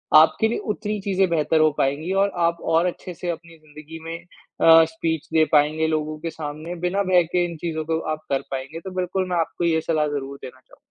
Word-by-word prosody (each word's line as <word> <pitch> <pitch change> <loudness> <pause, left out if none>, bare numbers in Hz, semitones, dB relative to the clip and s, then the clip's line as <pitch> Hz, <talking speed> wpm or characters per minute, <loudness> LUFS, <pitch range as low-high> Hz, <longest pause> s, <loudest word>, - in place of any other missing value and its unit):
आपके 160 +8 +6
लिए - - -1 0.2
उतनी 210 0 -4
चीज़ें 195 -1 +1
बेहतर 160 -1 +2
हो 155 -1 +5
पाएँगी 145 +6 0
और 200 - 0 0.2
आप 170 0 -1 0.2
और 170 +2 +4
अच्छे 180 +1 -6
से 175 +1 -5
अपनी 165 0 -6
ज़िंदगी 155 +1 -12
में 165 0 -4
अ, 165 -2 +4
स्पीच 160 -1 -3
दे 160 -1 +5
पाएँगे 155 +2 +3
लोगों 155 -1 -2
के 165 - -4
सामने। 155 +3 -6
बिना 200 +3 0
भय 180 -1 +6
के 175 -1 +3
इन 170 -2 -6
चीज़ों 160 -2 -2
को 160 0 0 0.2
आप 155 - -19
कर 135 - +1
पाएँगे 135 +4 -5
तो 190 - -5
बिल्कुल 185 +1 -1
मैं 180 - 0
आपको 165 +1 -1
ये 160 -1 +2
सलाह 155 -2 +2
ज़रूर 140 0 -6
देना 130 +1 -9
चाहूँगा। - - -22
160 Hz, 220 wpm, -23 LUFS, 155-175 Hz, 0.2 s, आपके